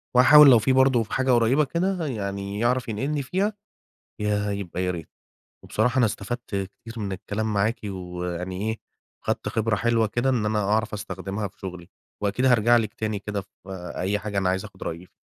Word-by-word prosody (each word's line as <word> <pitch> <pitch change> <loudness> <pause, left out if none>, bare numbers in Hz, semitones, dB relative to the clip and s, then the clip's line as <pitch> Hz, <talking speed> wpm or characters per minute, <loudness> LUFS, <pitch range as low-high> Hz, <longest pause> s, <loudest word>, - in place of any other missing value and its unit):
وهاحاول 145 +3 +9
لو 120 - +8
في 120 +5 +2
برضه 130 -3 +4
في 105 - -10
حاجة 130 -1 +2
قريّبة 120 +5 +4
كده 175 +3 -1
يعني 100 -4 -4
يعرف 120 +2 +1
ينقلني 135 +7 -1
فيها 195 +10 0 0.7
ياه! 105 -1 0
يبقى 95 -3 -3
يا 90 - 0
ريت. 85 -3 -7 0.6
وبصراحة 120 +4 +1
أنا 120 - +5
استفدت 115 +4 -4
كتير 100 +4 -5
من 100 -3 -3
الكلام 105 +3 -3
معاكِ 105 +3 +1
ويعني 90 +1 -4
إيه 110 - -4 0.5
خدت - - -1
خبرة 110 -1 0
حلوة 115 +1 +2
كده 120 +5 0
إن 115 -5 +1
أنا 105 0 +1
أعرف 105 +3 +1
أستخدمها 100 +1 -4
في - - -28
شُغلي، 90 -2 -8 0.3
وأكيد 105 +6 +1
هارجع 120 -1 +5
لِك 110 -1 0
تاني 110 -2 -2
كده 105 0 -4
في 95 - -15 0.5
أي 100 +3 0
حاجة 105 -1 -3
أنا 95 -1 +1
عايز 95 +1 0
آخُد - - -13
رأيِك 85 +2 -5
ف - - -39
105 Hz, 190 wpm, -25 LUFS, 100-120 Hz, 0.7 s, وهاحاول